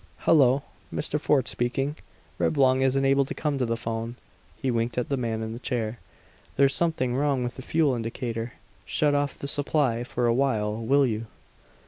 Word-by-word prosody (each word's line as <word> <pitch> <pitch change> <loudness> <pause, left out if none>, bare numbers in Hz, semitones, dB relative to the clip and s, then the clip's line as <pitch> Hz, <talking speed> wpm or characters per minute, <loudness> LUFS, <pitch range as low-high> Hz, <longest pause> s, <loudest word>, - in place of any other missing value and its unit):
"Hello 140 -3 +4 0.3
Mr. 150 0 -1
Fort 140 -4 +2
speaking; 135 +4 -1 0.4
Reblong 130 -3 +3
isn't 135 +1 +2
able 135 +1 +4
to 135 - -6
come 150 -3 -1
to 125 - +1
the 115 0 -1
phone." 115 +1 -4 0.4
He 130 - 0
winked 115 +1 -1
at 125 - -1
the 140 - +1
man 115 -3 -2
in 110 0 -4
the 115 - -7
chair. 120 -3 -2 0.6
"There's 140 0 +4
something 145 -6 0
wrong 135 -1 +1
with 120 0 -4
the - - -8
fuel 150 +1 +2
indicator. 115 0 -4 0.3
Shut 150 -1 +1
off 145 -1 0
the 140 - -5
supply 140 -4 +1
for 120 0 -2
a 120 - +3
while, 110 -5 +1
will 140 +4 +4
you?" 115 -2 -2
130 Hz, 180 wpm, -26 LUFS, 115-140 Hz, 0.6 s, Hello